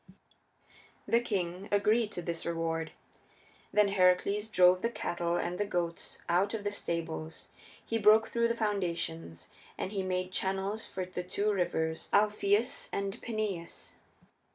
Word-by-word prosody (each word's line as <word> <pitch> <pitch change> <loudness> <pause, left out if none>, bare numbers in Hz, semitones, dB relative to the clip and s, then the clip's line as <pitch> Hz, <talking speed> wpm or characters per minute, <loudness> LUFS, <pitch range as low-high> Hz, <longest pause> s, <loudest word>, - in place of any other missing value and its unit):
The 235 - +4
king 190 -4 -3
agreed 210 +2 +3
to 175 - -4
this 170 -1 -3
reward. 165 -1 -2 0.8
Then 210 -1 +4
Heracles 195 +2 +3
drove 180 -2 +5
the 230 - +1
cattle 175 -6 -2
and 175 +1 -2
the 205 - +1
goats 170 -3 -3
out 190 +5 +2
of 210 - -5
the 205 - -1
stables; 165 -4 -4 0.4
he 230 - -1
broke 215 +1 +6
through 235 0 +1
the 235 - 0
foundations 170 - -2 0.3
and 190 - -3
he 200 -2 -1
made 185 0 -2
channels 195 +3 -1
for 185 -1 -4
the 180 0 -5
two 200 +4 0
rivers 160 -4 -1
Alpheus 210 +4 +2
and 200 0 -3
Peneius. 215 -7 -4
190 Hz, 140 wpm, -31 LUFS, 170-210 Hz, 0.8 s, broke